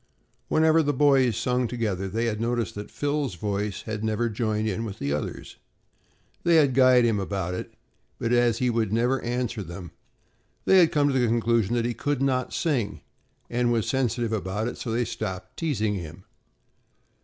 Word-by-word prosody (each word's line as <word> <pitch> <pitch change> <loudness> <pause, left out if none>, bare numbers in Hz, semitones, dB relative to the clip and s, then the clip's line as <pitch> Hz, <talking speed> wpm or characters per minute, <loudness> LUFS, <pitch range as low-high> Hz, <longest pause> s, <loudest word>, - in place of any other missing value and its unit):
Whenever 160 +1 +4
the 145 -2 0
boys 135 -1 +5
had 120 -4 0
sung 125 +2 0
together, 110 -5 -2
they 115 +5 -1
had 110 -2 -2
noticed 115 -1 -1
that 105 -1 -7
Phil's 145 -7 -2
voice 100 +2 -3
had 110 -1 -4
never 110 +2 0
joined 110 0 -1
in 110 +2 -2
with 105 -4 -6
the 70 0 -2
others. 75 - -5 0.8
They 170 -1 +3
had 145 -5 +5
guyed 130 -1 +6
him 110 -3 +2
about 95 -2 -3
it 90 - -6 0.4
but 115 - -1
as 120 -2 +3
he 125 0 +1
would 115 -3 0
never 120 +4 +1
answer 120 -2 -2
them, 85 -1 -8 0.7
they 190 - +6
had 170 -3 +5
come 145 -1 +3
to 130 - +2
the 120 - +2
conclusion 115 -1 +1
that 120 -1 +1
he 120 - -1
could 145 +4 -2
not 130 -2 0
sing 120 -11 -1 0.5
and 120 0 0
was 115 -3 0
sensitive 120 -3 0
about 105 +2 -2
it, - - -4
so 115 - -5
they 115 +2 +1
had 120 - -1
stopped 95 -5 -5
teasing 110 -11 -1
him. 85 -2 -7
115 Hz, 190 wpm, -26 LUFS, 105-125 Hz, 0.8 s, guyed